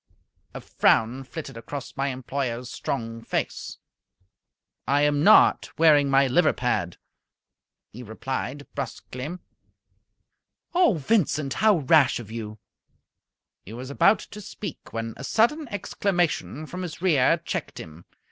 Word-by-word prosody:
A - - -6
frown 120 +4 +2
flitted 135 -2 -8
across 135 +3 -7
my 135 +1 -1
employer's 125 -2 -4
strong 115 -3 -4
face. - - -4 1.1
"I 140 +1 +3
am 145 0 +2
not 215 +5 +6
wearing 150 -3 +5
my 135 0 +4
liver 155 +6 +3
pad," 90 -8 -2 1.0
he 120 - -9
replied, 130 +4 -5
brusquely. 140 +3 -6 1.4
"Oh, 350 - +4
Vincent, 155 -5 0
how 215 -3 +3
rash 140 -2 +4
of 110 -3 -10
you!" 110 -2 -6 1.1
He 105 - -11
was 130 +3 -7
about 195 +9 +4
to 210 - -8
speak, 205 - -8
when 115 0 -4
a - - -8
sudden 250 - +1
exclamation 175 - -2
from 180 +4 -7
his 175 -4 -6
rear 150 -9 +4
checked - - -5
him. 80 +2 -11
140 Hz, 125 wpm, -25 LUFS, 125-170 Hz, 1.4 s, not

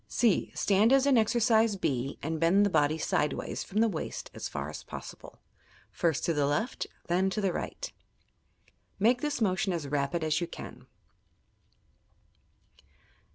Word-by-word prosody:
(c) 230 -5 +1
Stand 210 +4 +3
as 270 0 +5
in 280 -2 +4
exercise 225 -1 +3
(b) 135 -7 -2
and 160 +2 -2
bend 180 +5 +4
the 200 - 0
body 150 -2 +2
side 150 -1 0
ways - - -4
from 210 +3 -1
the 230 - +4
waist 175 -8 -5
as - - -5
far 70 +1 -4
as 75 - -7
possible - - -10 0.3
— - - -29
first 160 -4 +1
to 170 - +1
the 145 -2 +1
left, 150 - -1 0.2
then 185 +2 +1
to 200 - -3
the 195 -4 0
right. - - -5 1.0
Make 235 +5 +3
this 295 -4 -2
motion 190 -1 +1
as 160 -4 -3
rapid 145 +4 -1
as 155 +1 +1
you 175 - -1
can. - - -10
185 Hz, 160 wpm, -29 LUFS, 155-220 Hz, 1.0 s, as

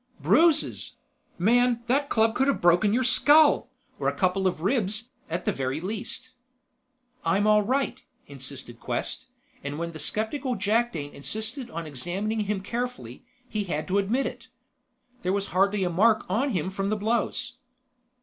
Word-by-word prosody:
"Bruises? 330 -1 +2 0.4
Man, 240 +5 +3
that 275 +3 +1
club 225 0 +3
could 270 +3 +1
have 280 - +1
broken 175 +4 +4
your 250 +4 +2
skull! 290 0 +5 0.3
Or 135 - -1
a 140 - 0
couple 185 +4 +1
of 175 -4 -2
ribs, 215 +3 0 0.2
at - - -3
the 210 - +2
very 135 -3 -2
least." 215 +7 -5 0.9
"I'm 200 +2 +2
all 210 0 +5
right," 260 +6 -1 0.2
insisted 130 -3 -8
Quest; - - -3 0.4
and 145 +1 -4
when 170 +1 -3
the 160 - -9
skeptical 250 - -1
Jakdane 205 -10 0
insisted 220 - -3
on 165 0 -5
examining 180 - -2
him 205 -2 -1
carefully, 205 - -5 0.2
he 210 -3 -3
had 155 -4 -3
to 195 +2 +3
admit 230 +8 0
it. - - -6 0.7
There 185 - 0
was 200 0 -1
hardly 195 +2 +2
a 180 - +1
mark 215 +5 +3
on 230 +10 0
him 185 - -1
from 195 +1 -2
the 215 - 0
blows. 235 +3 -1
210 Hz, 160 wpm, -26 LUFS, 175-240 Hz, 0.9 s, skull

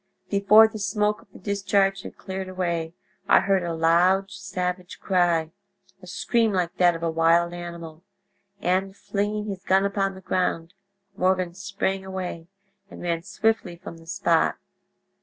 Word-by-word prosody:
Before 210 +2 +7
the 220 0 -8
smoke 210 +1 0
of - - -23
the - - -13
discharge 195 0 +1
had - - -10
cleared 190 -1 -6
away 170 -3 -2 0.3
I - - +6
heard 195 -1 +2
a 170 -1 -3
loud 180 +4 +3
savage 180 -2 -4
cry—a 170 -3 -2
scream 230 -2 +1
like 180 -2 -1
that 175 -2 +4
of 165 - -7
a 165 - 0
wild 165 +1 +3
animal—and, 185 +3 -5
flinging 205 +1 -2
his 195 -3 -6
gun 190 +1 +3
upon 195 -1 -1
the 190 - -11
ground, 175 -2 -1 0.4
Morgan 185 -1 +1
sprang 195 0 -3
away 185 -3 -6 0.4
and - - -11
ran 170 -1 -1
swiftly 215 -1 -1
from 170 -1 -10
the 165 0 -17
spot. 170 -3 +2
185 Hz, 145 wpm, -25 LUFS, 170-200 Hz, 0.4 s, Before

